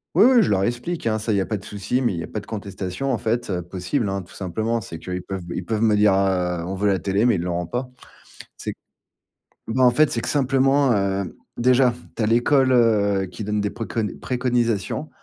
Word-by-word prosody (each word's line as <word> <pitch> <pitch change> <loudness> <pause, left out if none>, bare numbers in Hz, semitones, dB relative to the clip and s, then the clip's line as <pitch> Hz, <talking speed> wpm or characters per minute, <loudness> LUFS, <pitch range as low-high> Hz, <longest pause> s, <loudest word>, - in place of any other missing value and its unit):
Oui, 195 - +7
oui, 240 - +6
je - - 0
leur 95 -1 +2
explique, 120 - -2
hein, 110 0 +1
ça 110 0 -1
il - - +2
y 100 - +2
a - - -1
pas 105 - -2
de 100 - -12
souci, 105 +5 -2
mais 120 -6 +1
il 85 - -4
y - - -4
a - - -7
pas 105 - -4
de - - -12
contestation, 100 +4 -4
en 120 - +1
fait, 115 0 -1
heu, 90 -2 -1
possible, 95 - -2
hein, 95 0 -2
tout 90 - -15
simplement. 110 +5 -2
C'est 85 -6 -8
qu'ils 90 +2 -5
peuvent 95 -1 -6
me 85 - -6
ils 90 - -4
peuvent 110 -1 -1
me 110 -2 +4
dire, 105 -2 +5
heu, 90 -3 +1
on 95 - -4
veut 100 +2 0
la 95 -2 +2
télé, 100 +5 +1
mais 120 - +4
ils 85 - -1
l'auront 85 0 -2
pas. 125 +5 -3 0.7
C'est - - -5
q - - -17 0.9
bah 130 +3 0
en 125 - +8
fait, 150 +4 +3
c'est 115 - -1
que - - -4
simplement, 135 -1 +3
heu, 100 -2 -1 0.2
déjà, 125 0 +4 0.2
tu - - -4
as 105 - +2
l'école, 130 +3 +3
heu, 100 -5 +3
qui 90 +4 -8
donne 105 +1 -1
des 105 0 -1
préconnes 115 -3 -4
préconisations, 120 0 -1
105 Hz, 250 wpm, -22 LUFS, 95-120 Hz, 0.9 s, en